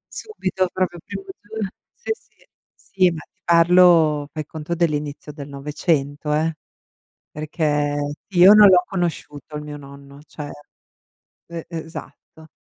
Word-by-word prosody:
Subito 190 - -2
proprio, 180 -2 -2
primo - - -6 0.2
gio 215 0 -4 0.3
sì, 470 -1 -8
sì. 475 +2 -14 0.3
Sì, 185 -2 +1
ma 165 - -6
ti - - -24
parlo, 170 -3 +5
fai 155 -1 -5
conto 155 +2 -5
dell'inizio 150 -3 -2
del 145 -1 -9
900, 145 +1 -1
eh. 160 +1 +1 0.8
Perché 145 -2 -1
io 185 0 +7
non 210 -1 +9
l'ho 180 -2 +6
conosciuto 155 -5 -4
il 150 - -5
mio 150 0 -7
nonno, 140 0 -13
cioè 150 -1 -8 1.0
e 170 -1 -7
esatto. 160 -1 -9
160 Hz, 130 wpm, -22 LUFS, 145-180 Hz, 1.0 s, non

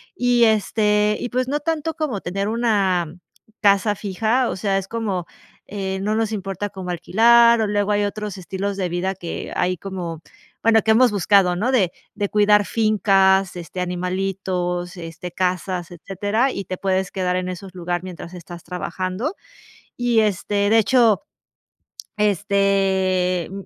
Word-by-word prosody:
Y, 245 -1 +3
este 210 0 +2
y - - -3
pues 255 +1 -1
no 295 - 0
tanto 320 +1 -2
como 295 - -3
tener 195 +3 -3
una 200 -8 +1 0.5
casa 205 0 +3
fija, 220 +6 0
o - - -3
sea, 195 0 0
es 195 -1 -3
como, 200 -6 -3 0.4
eh, 190 -1 -4
no 210 +2 0
nos 225 -1 0
importa 195 -1 -4
como 185 -2 -6
alquilar 235 +6 +5
o 215 - +1
luego 205 0 0
hay 205 0 +2
otros 205 -1 -5
estilos 195 +2 -4
de 185 -2 -1
vida 185 +2 -2
que 175 -2 -6
hay 180 +1 +1
como 175 -3 -6 0.4
bueno, 225 -1 +5
que 220 - +3
hemos 240 +2 +5
buscado, 195 -2 +3
¿no?, 235 +7 0
de 190 -8 +3 0.2
de 205 -1 -2
cuidar 210 -1 +4
fincas, 195 -4 +2
este, 175 +1 -6
animalitos, 180 0 -2
este, 165 +1 -7
casas, 180 -1 -2
etcétera, 205 +8 -1
y 200 - -4
te 185 - -5
puedes 190 0 -1
quedar 180 -1 -1
en 185 0 -3
esos 185 +1 -8
lugar 175 0 -2
mientras 180 -1 -9
estás 175 -1 -10
trabajando. 185 - -4 0.6
Y 245 -2 +2
este, 205 0 0
de 225 - +5
hecho, 230 -2 +4 1.0
este, 195 -3 +1
195 Hz, 150 wpm, -21 LUFS, 185-215 Hz, 1.0 s, alquilar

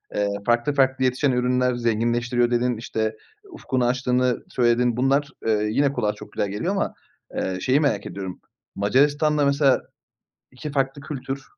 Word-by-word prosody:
Eee, 105 0 +1 0.2
farklı 120 +4 +2
farklı 130 -1 +2
yetişen 130 +2 +2
ürünler 125 0 +1
zenginleştiriyor 120 +1 +1
dedin. 120 -1 +1
İşte, 110 -1 -2 0.4
ufkunu 130 - -1
açtığını 125 0 +1
söyledin. 120 -1 +2
Bunlar, 135 +3 +2 0.2
eee, 105 -1 +2
yine 140 +3 +2
kulağa 105 -5 0
çok - - -12
güzel 100 - -2
geliyor 105 - -2
ama, 200 - -1 0.4
eee, 95 -1 -2
şeyi, 130 +3 +3
merak 145 -2 0
ediyorum. 95 -2 -6 0.4
Macaristan'da 145 +7 +2
mesela 140 -1 +3 0.7
2 150 +4 -7
farklı 135 0 -1
kültür 135 -1 -5
125 Hz, 145 wpm, -23 LUFS, 120-140 Hz, 0.7 s, şeyi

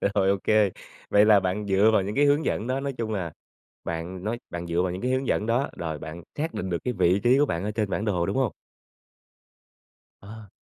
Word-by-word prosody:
Rồi, 95 -1 +3
ô 100 - +3
kê, 105 -3 +3 0.4
vậy 105 +1 +5
là 105 -2 +6
bạn 95 +2 -2
dựa 100 +2 +4
vào 110 - +4
những 100 +2 -4
cái 145 +1 +4
hướng 145 +2 +3
dẫn 110 - -1
đó, 130 +1 0
nói 140 0 -3
chung 115 -2 -3
là, 90 -6 -3 0.5
bạn 85 +3 -5
nói 115 +3 -2
bạn 85 0 -5
dựa 85 +1 +1
vào 90 -1 -1
những 90 - -6
cái 125 - 0
hướng 130 +1 0
dẫn 105 - 0
đó 120 +5 +1
rồi 80 -3 -4
bạn 80 +3 -8 0.2
xác 160 +3 -2
định 95 - -3
được 85 - 0
cái 125 - 0
vị 90 0 +3
trí 125 +3 +5
của 145 - +4
bạn 85 -7 -2
ở 105 - -1
trên 105 -2 -2
bản 100 - -1
đồ, 90 -5 0
đúng - - -2
hông? 130 -6 +1 1.7
Ờ. 105 +1 -11
105 Hz, 245 wpm, -26 LUFS, 90-120 Hz, 1.7 s, là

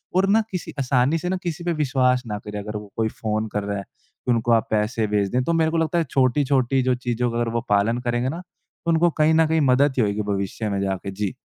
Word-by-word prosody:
और 190 +1 +3
ना 220 +3 +5
किसी 180 -4 -5
आसानी 130 +3 +2
से 180 +2 -3
ना 190 - 0
किसी 170 0 -4
पे 175 0 0
विश्वास 130 -4 +1
ना 105 -1 -4
करें 105 0 -6
अगर 105 +1 -5
वो 105 -1 -10
कोई 110 -1 +1
फ़ोन 110 0 -1
कर 105 - -1
रहा 100 0 -3
है, 100 - -5
कि 125 - -7
उनको 120 0 +1
आप 115 -1 +2
पैसे 110 +1 0
भेज 100 -1 0
दें। 125 - +2
तो 170 - 0
मेरे 160 -1 +2
को 165 - 0
लगता 165 +1 +1
है 170 - +3
छोटी-छोटी 130 0 +2
जो 130 0 +2
चीज़ों 120 -1 -1
का 115 - -3
अगर 120 - 0
वो 115 - 0
पालन 105 +4 +2
करेंगे 120 +1 -1
ना, 165 +5 -5
तो 175 -1 -7
उनको 165 +1 +4
कहीं 155 +1 +4
न 160 0 +4
कहीं 160 0 +2
मदद 140 +2 +3
ही - - +4
होएगी 105 -1 0
भविष्य 100 +1 -2
में 100 -1 -1
जाके। 95 0 -3
जी। 100 +2 -3
125 Hz, 260 wpm, -23 LUFS, 105-155 Hz, -, ना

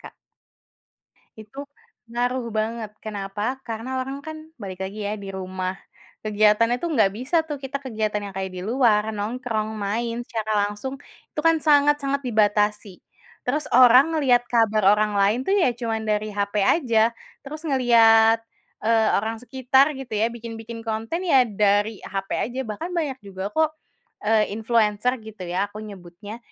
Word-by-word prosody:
Kak. - - -12 1.3
Itu 215 +5 -14 0.5
ngaruh 245 +1 -1
banget. 220 0 -2
Kenapa? 210 +4 -3
Karena 225 +1 -5
orang 270 +2 -6
kan 315 0 -6 0.3
balik 190 -2 -6
lagi 195 +3 -7
ya 205 - -2
di 200 -2 -9
rumah. 185 -1 -4 0.5
Kegiatannya 215 +2 +3
tuh 340 - -1
enggak 215 -7 +4
bisa 260 +7 -1
tuh 295 - -3
kita 275 +1 -5
kegiatan 215 -5 -2
yang 190 - -16
kayak 190 -1 -3
di 180 - -5
luar, 225 -1 +3
nongkrong, 220 0 -3
main 230 +3 -2
secara 215 -2 0
langsung. 210 +6 -6 0.4
Itu 300 - -1
kan 330 0 +4
sangat-sangat 290 -2 +3
dibatasi. 210 -4 +1 0.4
Terus 295 +4 -1
orang 255 +5 +7
ngelihat 250 -5 +3
kabar 220 -3 +2
orang 210 0 0
lain 200 +4 +3
itu 265 - -3
ya 355 - +4
cuma 230 -2 -2
dari 215 -1 -1
hape 205 0 -1
aja, 230 - +3 0.3
terus 305 +3 -8
ngelihat, 230 -4 +5 0.5
eee, 225 -1 +3
orang 225 +2 -4
sekitar 265 +3 +3
gitu 255 -4 -7
ya, 220 +2 +1
bikin-bikin 230 0 -8
konten 225 +12 -3
ya 270 -7 +6
dari 205 -1 +1
hape 195 0 -3
aja, 255 +3 -2
bahkan 290 - -6
banyak 290 -6 -2
juga 195 -1 -6
kok, 315 +5 +1 0.5
eee, 215 -1 +2
influencer 225 +2 +1
gitu 215 -3 -9
ya 180 +3 -1
aku 210 +1 -10
nyebutnya, 205 +1 -10
225 Hz, 150 wpm, -23 LUFS, 210-255 Hz, 1.3 s, orang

